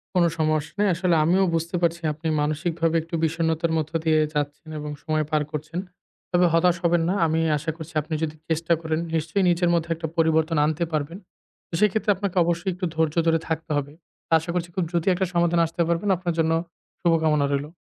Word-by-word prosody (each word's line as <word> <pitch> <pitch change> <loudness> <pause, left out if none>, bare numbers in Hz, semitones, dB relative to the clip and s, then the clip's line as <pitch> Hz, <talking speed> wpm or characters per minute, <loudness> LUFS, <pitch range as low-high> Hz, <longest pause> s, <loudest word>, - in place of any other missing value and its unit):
কোন 180 - +5 0.2
সমস্যা 155 -1 0
নাই 210 - +3
আসলে 175 0 +1
আমিও 180 +5 +3
বুঝতে 165 +2 -2
পারছি 170 0 +1
আপনি 160 +2 -6
মানসিকভাবে 160 +2 0
একটু 165 +2 -6
বিষণ্ণতার 160 0 0
মধ্য 155 0 -2
দিয়ে 160 -1 +3
যাচ্ছেন 150 +1 -3
এবং 150 0 -5
সময় 155 -1 0
পার 155 -1 +2
করছেন। 155 +3 -4 0.5
তবে 180 0 +4
হতাশ 170 +1 +4
হবেন 170 0 +3
না, - - +2
আমি 160 +1 +1 0.2
আশা 155 +3 -3
করছি 160 +1 -9
আপনি 155 +2 -7
যদি 155 -1 -2
চেষ্টা 165 +1 +1
করেন 160 0 -1 0.2
নিশ্চয়ই 165 +5 0
নিজের 175 0 +2
মধ্যে 170 -1 0
একটা 160 0 -4
পরিবর্তন 160 0 +2
আনতে 155 +2 0
পারবেন। 155 +2 -2 0.5
তো - - -25
সেক্ষেত্রে 210 +1 +2
আপনাকে 195 -1 -3
অবশ্যই 175 +3 -1
একটু 180 +1 -4
ধৈর্য 160 -1 +1
ধরে 165 0 +3
থাকতে 160 0 -3
হবে। 145 0 -3 0.5
আশা 165 +2 -6
করছি 175 -1 -2
খুব 185 - +1
দ্রুতি 170 0 -1
একটা 190 +1 0
সমাধানে 170 0 +3
আসতে 165 +1 -3
পারবেন, 170 +4 0
আপনার 175 -1 -2
জন্য 160 0 +2 0.5
শুভকামনা 160 -3 +3
রইলো। 140 +2 -2
165 Hz, 190 wpm, -24 LUFS, 155-175 Hz, 0.5 s, কোন